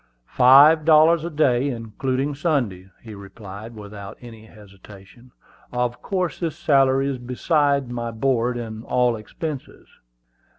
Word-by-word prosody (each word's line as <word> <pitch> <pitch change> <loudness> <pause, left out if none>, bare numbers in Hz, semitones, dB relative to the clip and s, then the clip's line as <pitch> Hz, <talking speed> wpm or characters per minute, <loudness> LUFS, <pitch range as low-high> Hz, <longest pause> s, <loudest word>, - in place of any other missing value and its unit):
"Five 145 - +6
dollars 160 +1 +5
a 170 - -4
day, 140 -4 +1
including 130 +4 -3
Sundays," 130 - -2
he 110 -2 -10
replied, 100 +2 -11
without 100 -1 -10
any 115 -2 -13
hesitation. 105 +3 -17 0.4
"Of 125 0 -2
course 185 -3 -3
this 160 -3 -4
salary 135 -4 +2
is 135 -2 -3
besides 140 +2 0
my 120 -1 -4
board 120 +1 -1
and 110 -2 -7
all 125 -1 +1
expenses." 135 +6 -8
125 Hz, 125 wpm, -22 LUFS, 110-145 Hz, 0.4 s, Five